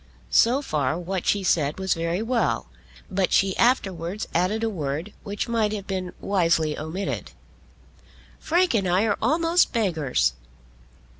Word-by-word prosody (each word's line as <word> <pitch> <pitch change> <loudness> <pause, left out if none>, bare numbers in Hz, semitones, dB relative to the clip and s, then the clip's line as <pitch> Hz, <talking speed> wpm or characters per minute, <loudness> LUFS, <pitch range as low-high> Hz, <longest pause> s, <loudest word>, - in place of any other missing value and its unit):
So 255 +5 +4
far 150 - -1
what 180 +1 -4
she 200 -1 +2
said 150 -5 +1
was 190 -1 +1
very 170 +4 -2
well, 225 - 0 0.4
but 185 -1 +1
she 195 -1 +3
afterwards 195 -5 0
added 190 +6 +1
a - - +2
word 160 -1 -3
which 205 +1 -4
might 225 -3 +1
have 200 -2 -5
been 185 -2 -3
wisely 165 -5 +1
omitted. 165 +6 -4 1.1
"Frank 350 -1 +2
and 200 -5 +1
I 180 +3 +3
are 205 -2 +1
almost 330 +2 +2
beggars." 155 - +1
190 Hz, 140 wpm, -24 LUFS, 165-220 Hz, 1.1 s, So